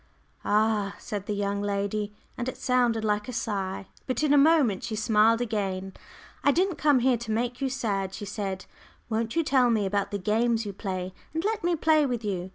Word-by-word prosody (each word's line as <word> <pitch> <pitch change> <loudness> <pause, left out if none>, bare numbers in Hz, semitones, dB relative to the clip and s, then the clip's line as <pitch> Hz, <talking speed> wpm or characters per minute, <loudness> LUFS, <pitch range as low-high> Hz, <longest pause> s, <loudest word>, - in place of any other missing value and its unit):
"Ah," 210 -1 +1
said 205 -2 -6
the 210 - -1
young 200 0 -1
lady, 205 +1 -1 0.2
and 245 +1 -3
it - - -7
sounded 240 -3 +1
like 210 0 0
a - - -4
sigh. 195 -5 -3 0.2
But 255 +3 -1
in 295 -1 +3
a - - +6
moment 280 - +4
she 225 - -3
smiled 220 +1 +3
again. 195 -4 -2 0.5
"I 285 - +5
didn't 360 +3 +1
come 290 -4 +4
here 250 0 +3
to 230 -1 -5
make 245 +3 -1
you 270 - +1
sad," 205 -7 -2
she 210 - -6
said. 195 -2 -4 0.5
"Won't 225 +1 -1
you 330 - +3
tell 260 -4 +3
me 220 -3 +2
about 200 +1 0
the 205 - -2
games 225 +3 +1
you 200 - -5
play, 185 -2 -4 0.2
and 325 +3 -1
let 435 -2 -1
me 350 0 +2
play 310 -2 +3
with 240 -3 -3
you. 185 -3 -2
220 Hz, 205 wpm, -27 LUFS, 200-250 Hz, 0.5 s, a